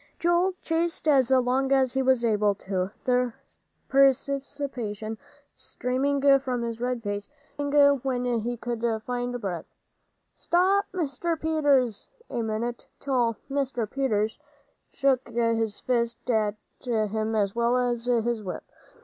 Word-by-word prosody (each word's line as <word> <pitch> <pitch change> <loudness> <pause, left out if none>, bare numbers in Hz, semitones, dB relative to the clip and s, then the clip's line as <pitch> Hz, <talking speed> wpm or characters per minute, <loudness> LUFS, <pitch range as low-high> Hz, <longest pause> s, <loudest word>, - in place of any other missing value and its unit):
Joel 345 +2 +2
chased 330 0 -1
as 270 -4 +4
long 260 +1 +2
as 265 -2 +3
he 265 - +1
was 260 -2 +3
able 210 -2 +2
to, 190 -2 -2 0.2
the 250 -1 +2 0.5
perspiration 270 -5 0 0.3
streaming 275 +2 +1
from 255 -3 -2
his 230 0 -4
red 250 -1 -2
face, 205 -1 -4 0.3
screaming 285 -1 +4
when 250 -1 -2
he 240 +2 -3
could 235 0 -4 0.2
find 245 0 -2
breath, 185 -6 -4 0.7
"Stop, 385 +3 +2
Mr. 330 -1 -2
Peters, 285 -9 +1 0.2
a 240 - -1
minute," 225 +2 -3
till 245 -5 0
Mr. 270 -5 -1
Peters 220 -3 -1 0.5
shook 265 -3 +1
his 230 -2 0
fist 235 -1 -1
at 215 -2 +1 0.3
him 220 -2 -1
as 200 -2 +1
well 235 +1 +2
as 240 -1 0
his 235 -2 +1
whip. 185 - -5
245 Hz, 125 wpm, -26 LUFS, 225-275 Hz, 0.7 s, as